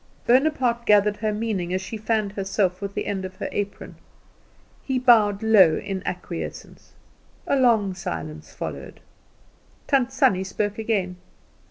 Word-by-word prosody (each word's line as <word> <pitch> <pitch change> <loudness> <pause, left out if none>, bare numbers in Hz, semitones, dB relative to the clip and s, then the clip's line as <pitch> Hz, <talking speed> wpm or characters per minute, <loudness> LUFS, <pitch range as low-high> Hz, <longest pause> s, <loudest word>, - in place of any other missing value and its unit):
Bonaparte 250 -2 +2
gathered 210 0 +4
her 215 0 -1
meaning 210 -5 -2
as - - 0
she 190 +4 -7
fanned 215 -1 -1
herself 195 -2 -1
with 200 0 -5
the - - -2
end 195 -2 -3
of 185 0 -7
her 195 - -4
apron. 205 -1 -5 0.8
He 265 -1 -2
bowed 220 -5 +4
low 195 -8 +6
in 195 -2 -4
acquiescence. 175 -2 -7 0.5
A - - +1
long 230 -7 +3
silence 80 - -6
followed. - - -7 0.9
Tant 265 -2 +1
Sannie 195 -8 +2
spoke 205 +2 -3
again. 195 -5 -1
205 Hz, 140 wpm, -24 LUFS, 190-230 Hz, 0.9 s, low